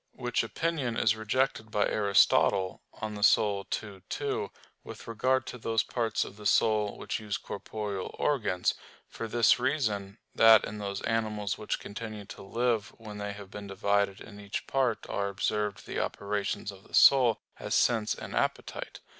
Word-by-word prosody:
Which 120 -1 -1
opinion 130 0 -2
is 110 -1 +3
rejected 110 +1 0
by 105 -1 +2
Aristotle 100 -2 +3
(De - - -6
Anima 105 -1 -5 0.2
ii, 100 -1 -3
2), 430 +1 -2 0.3
with - - -10
regard 130 +4 +1
to 125 - -7
those 115 -1 +1
parts 115 -3 -1
of 100 - -11
the 105 -1 -2
soul 105 0 +2
which - - -3
use 105 -2 -3
corporeal 100 -2 -5
organs; 110 -11 +1 0.3
for 115 - -6
this 115 +1 +4
reason, 110 -7 -1 0.2
that 110 -1 +7
in 105 0 -6
those 100 -1 -4
animals 110 -3 -1
which 105 - -2
continue 110 -1 -7
to - - -10
live 115 +1 -1
when 105 -2 -9
they 105 0 -3
have 100 -1 -11
been 105 -1 -7
divided 100 0 0
in 105 -2 -11
each 100 0 -5
part 130 -4 0
are 100 0 -1
observed 105 +1 -2
the - - -3
operations 100 0 -2
of 95 -1 -15
the - - -5
soul, 125 -5 +6 0.2
as - - -2
sense 110 -3 +2
and - - -8
appetite. - - -2
105 Hz, 165 wpm, -29 LUFS, 100-115 Hz, 0.3 s, that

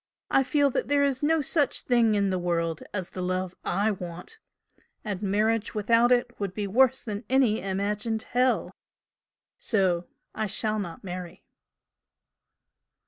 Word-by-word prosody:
I - - +5
feel 285 +1 +2
that 270 - -1
there 285 0 +3
is 275 -1 0
no 315 +1 +2
such 290 0 +1
thing 235 -3 +3
in 200 -1 +1
the 185 - 0
world 170 -2 -1
as 185 -3 -5
the 185 - -5
love 185 0 -2
I 210 +3 +1
want 180 - -8 0.7
and 200 -3 -3
marriage 215 +2 0
without 230 +3 +3
it 245 -1 +1
would 195 -3 -3
be 210 - -2
worse 260 +6 +3
than 210 0 -5
any 255 -5 +3
imagined 205 +3 -2
hell. 250 +1 +1 0.9
So 185 -5 +1 0.3
I 220 0 -2
shall 215 +2 0
not 175 -5 -6
marry." 180 -2 -7
210 Hz, 145 wpm, -27 LUFS, 185-245 Hz, 0.9 s, I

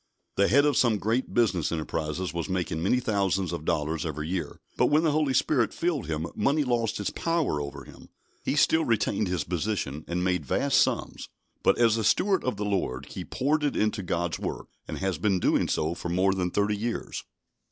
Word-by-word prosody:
The 100 - +3
head 140 +5 +5
of 145 -3 +2
some 115 -4 +3
great 115 +5 -1
business 95 -9 +1
enterprises 80 +2 -3
was 85 -3 -3
making 90 -4 -2
many 105 +8 +2
thousands 95 -6 0
of 85 -2 -5
dollars 75 +1 0
every 75 -1 -4
year; 85 -4 -3 0.2
but - - +3
when 150 +2 +3
the 160 - +3
Holy 145 -3 +1
Spirit 125 -4 +2
filled 165 -7 -1
him 80 0 -2
money 145 +7 +1
lost 115 -4 0
its 105 - -2
power 165 - 0
over 70 -1 -6
him. - - -15 0.3
He - - 0
still 160 +2 +4
retained 110 -3 +1
his 90 -4 -1
position, 85 -4 -2
and 90 +1 -1
made 90 -1 +1
vast 140 0 +2
sums; - - -1 0.3
but, - - +3
as 115 -2 +4
a 110 - -1
steward 190 - +2
of 125 -5 -1
the 105 - -2
Lord, 95 -11 -2
he - - -5
poured 150 +3 0
it 145 - 0
into 105 -1 0
God's 85 -2 -2
work, - - -5 0.2
and - - -5
has 95 -5 -2
been 100 -3 +2
doing - - +2
so 80 +2 0
for 85 - -5
more 95 +3 +2
than 90 -2 -1
thirty 105 +3 +1
years. 115 +3 -4
100 Hz, 205 wpm, -27 LUFS, 85-120 Hz, 0.3 s, head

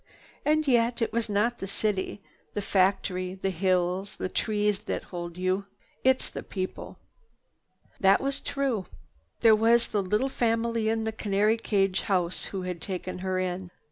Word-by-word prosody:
And 310 0 +2
yet, 235 -2 +3
it - - -2
is 230 -1 0
not 215 +4 +1
the 195 - -4
city, 200 -1 -1 0.3
the 205 - 0
factory, 185 -1 +1
the 195 0 -2
hills, 185 +1 0
the 185 - -3
trees 210 0 +1
that - - -2
hold 175 -1 -6
you. 185 +2 0 0.4
It's 260 0 +3
the - - -5
people." 185 -2 -5 1.0
This 195 0 +6
was 275 0 -1
true. 265 -9 -1 0.5
There 225 -2 +7
was 230 +2 +4
the 210 - +1
little 210 +7 +1
family 230 -3 0
in 225 0 0
the 220 - -1
canary 210 0 +1
cage 195 -4 +1
house 180 -3 0
who 190 -2 -4
had 180 -2 -4
taken 185 -1 -4
her 185 0 -1
in. 185 0 -2
200 Hz, 160 wpm, -28 LUFS, 185-225 Hz, 1.0 s, There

